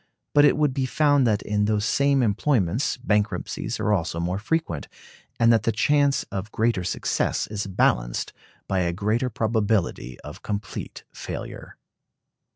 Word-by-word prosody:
But 145 0 +6
it 145 - +4
would 150 -3 +2
be 130 -1 -1
found 145 -3 +3
that 105 -2 +1
in 105 0 0
those 105 0 +1
same 140 +2 +2
employments 110 - +1
bankruptcies 105 -4 -1
also 90 -5 0
are - - -2
more 90 +3 -1
frequent, 120 - -2 0.5
and 115 0 +5
that 115 - +3
the 115 - +1
chance 140 +5 +2
of 100 +3 -4
greater 110 -4 +1
success 90 - -1
is 105 -1 -4
balanced - - 0 0.3
by 95 - 0
a 85 -1 0
greater 110 +7 0
probability 110 - -1
of - - -10
complete 105 0 -5
failure. - - -7
110 Hz, 150 wpm, -24 LUFS, 100-130 Hz, 0.5 s, But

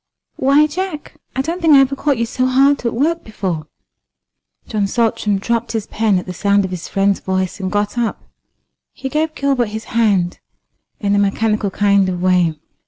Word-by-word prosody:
"Why, 280 +3 +4
Jack, 340 0 -5 0.2
I 265 - 0
don't 335 +5 -3
think 320 -3 +6
I - - +8
ever 270 0 +3
caught 280 -1 0
you 235 - 0
so 255 +2 -1
hard 270 +2 +3
at - - 0
work 325 +7 0
before." 185 -8 -4 1.0
John 210 -3 -1
Saltram 215 -2 0
dropped 235 +4 -2
his 220 -2 -2
pen 215 -3 +1
at 180 - -3
the 185 - -6
sound 200 +2 +2
of 185 - -6
his 180 -2 -5
friend's 195 0 +1
voice 185 0 -2
and 185 -1 -3
got 205 +3 -1
up. 235 -2 -2 0.7
He 265 - -5
gave 310 +2 -1
Gilbert 275 -4 +1
his 220 +1 -6
hand 200 -6 +1 0.6
in 200 -1 0
a 205 - +3
mechanical 210 +1 +1
kind 200 -1 +2
of 180 -1 -3
way. 180 -3 +2
220 Hz, 185 wpm, -18 LUFS, 195-270 Hz, 1.0 s, I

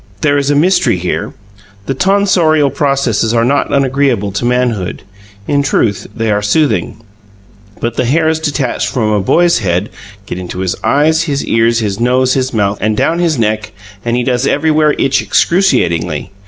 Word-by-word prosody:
There 145 -1 +2
is 140 0 -1
a 145 - +2
mystery 165 - +2
here: 90 0 -3 0.5
the 135 - -2
tonsorial 175 -4 +2
processes 130 -6 0
are 115 0 +2
not 140 +3 0
unagreeable 135 -6 +1
to 105 +5 -3
manhood; 120 -6 -1 0.4
in 145 -1 +1
truth, 115 -7 0
they 115 -1 -1
are 105 0 +1
soothing; 105 - 0 0.8
but 115 0 -3
the - - +1
hairs 160 +4 +1
detached 145 -5 -2
from 110 -5 -1
a 105 - +1
boy's 170 - +2
head 95 0 -1 0.4
get 90 - -6
into 90 0 -6
his 95 -1 -1
eyes, 155 +3 +2
his 140 -3 -2
ears, 115 +1 +1
his 105 -1 -3
nose, 125 +2 +2
his 130 0 -1
mouth, 100 -2 -1
and 110 0 0
down 165 +7 +1
his 165 -4 +1
neck, 110 -1 -1 0.3
and 120 0 -1
he 125 - 0
does 125 +1 0
everywhere 155 +1 +2
itch 135 - +1
excruciatingly. 85 - 0
125 Hz, 170 wpm, -13 LUFS, 105-145 Hz, 0.8 s, There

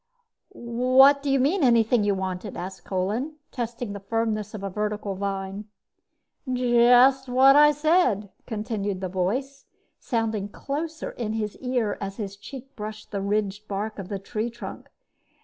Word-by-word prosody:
"What 255 -1 +4
do 280 - -2
you 275 0 +3
mean, 300 +7 +2
anything 235 -2 +4
you 205 -1 +2
wanted?" 190 +1 -4
asked 185 +2 -7
Kolin, 210 +11 -2 0.2
testing 240 -3 -4
the 200 - -6
firmness 215 0 -2
of 200 - -7
a 195 - -2
vertical 210 0 -2
vine. 195 +1 -4 0.9
"Just 250 +2 +5
what 265 +2 +6
I 295 0 +8
said," 295 - +2 0.2
continued 210 -3 -3
the 185 -1 -3
voice, 255 +10 -2 0.3
sounding 220 -4 -2
closer 310 +8 -4
in 220 -3 -4
his 215 -2 -3
ear 250 -5 -1
as 195 0 -5
his 200 -2 -5
cheek 265 +6 -11
brushed 215 -1 -7
the 200 -2 -2
ridged 205 +1 -1
bark 210 +2 -4
of 190 - -7
the 200 - -2
tree 215 +4 -3
trunk. 235 +1 -9
220 Hz, 150 wpm, -25 LUFS, 200-255 Hz, 0.9 s, I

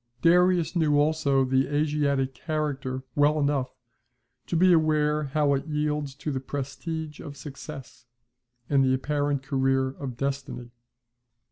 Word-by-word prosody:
Darius 180 0 +4
knew 150 -4 +3
also 145 -3 +2
the 130 +1 +2
Asiatic 145 -2 0
character 135 -2 -3
well 150 +1 +3
enough 140 -3 0 0.8
to - - -2
be 180 +2 +5
aware 150 -2 +2
how 145 0 +1
it 140 +2 -2
yields 150 -2 -2
to 150 +2 -4
the 135 - -2
prestige 150 +3 -5
of 145 -1 -9
success, 135 -3 -10 0.6
and 140 -2 +3
the 130 0 +3
apparent 145 0 -1
career 135 -1 +1
of 130 -2 -7
destiny. 135 -3 -4
145 Hz, 130 wpm, -26 LUFS, 135-150 Hz, 0.8 s, be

